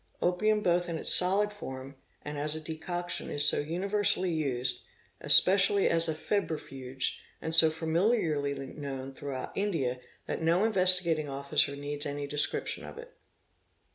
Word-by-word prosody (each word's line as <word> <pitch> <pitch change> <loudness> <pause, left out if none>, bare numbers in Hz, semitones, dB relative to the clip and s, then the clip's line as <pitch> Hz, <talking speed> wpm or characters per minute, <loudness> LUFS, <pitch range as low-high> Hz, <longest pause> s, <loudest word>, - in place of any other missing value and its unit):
Opium 210 +4 0
both 175 0 0
in 165 - -3
its - - +2
solid 200 +3 +4
form 135 -8 -9 0.3
and 150 0 -7
as 150 +1 -1
a - - -5
decoc 175 +3 -5
tion - - -2
is 145 0 +5
so - - +4
universally 185 +3 0
used, 125 -5 -1 0.4
especially 195 +1 +4
as 165 0 +2
a 160 - -2
febrifuge, 135 -8 -3 0.2
and 160 - -5
so 160 -1 +8
familiarily 160 -3 -1 0.2
known 135 -2 -7
throughout 135 -1 -7
India, 155 -12 -2 0.3
that - - -5
no 170 +4 +1
Investigating 180 -7 +4
Officer 140 +1 0
needs 145 +1 -4
any 145 0 -5
des 145 +1 -7
eription 150 - -1
of - - -11
it. 485 +1 -12
160 Hz, 150 wpm, -28 LUFS, 145-185 Hz, 0.4 s, so